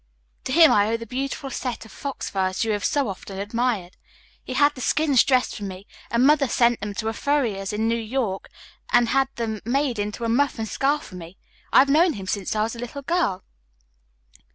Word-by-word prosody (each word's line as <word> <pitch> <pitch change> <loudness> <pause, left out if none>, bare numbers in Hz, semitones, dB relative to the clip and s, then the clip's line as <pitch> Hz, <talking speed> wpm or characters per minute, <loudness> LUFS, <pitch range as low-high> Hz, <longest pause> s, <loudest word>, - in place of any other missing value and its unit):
To - - -3
him 325 +2 +7
I 205 0 +4
owe 230 - 0
the 230 - -8
beautiful 270 +3 -4
set 250 -4 -4
of 220 - -14
fox 280 -1 -5
furs, 190 0 -1
you 225 - 0
have 205 -1 -2
so 285 -3 +1
often 195 0 -7
admired. 210 -2 -2 0.5
He - - -6
had 290 0 +4
the 255 - -9
skins 285 0 +3
dressed 255 -2 +1
for 205 - -7
me, 190 0 -7 0.2
and 235 +3 +2
Mother 290 -1 +4
sent 235 -1 +2
them 205 0 -5
to 220 +1 -2
a - - -3
furrier's 225 -9 -1
in 215 +2 -1
New 230 - +2
York 220 -4 -3 0.4
and 240 -1 +4
had 270 0 +2
them 220 -3 -3
made 255 -1 0
into 210 +3 -3
a - - 0
muff 275 +5 +1
and 220 -1 -3
scarf 285 +6 0
for - - -11
me. 170 +2 -11 0.3
I - - +4
have 275 - +7
known 325 +4 +4
him 195 -6 -7
since 195 +1 -2
I 215 - +2
was 225 +2 -3
a - - -10
little 245 +4 -6
girl." 275 - 0
230 Hz, 220 wpm, -24 LUFS, 205-275 Hz, 0.5 s, him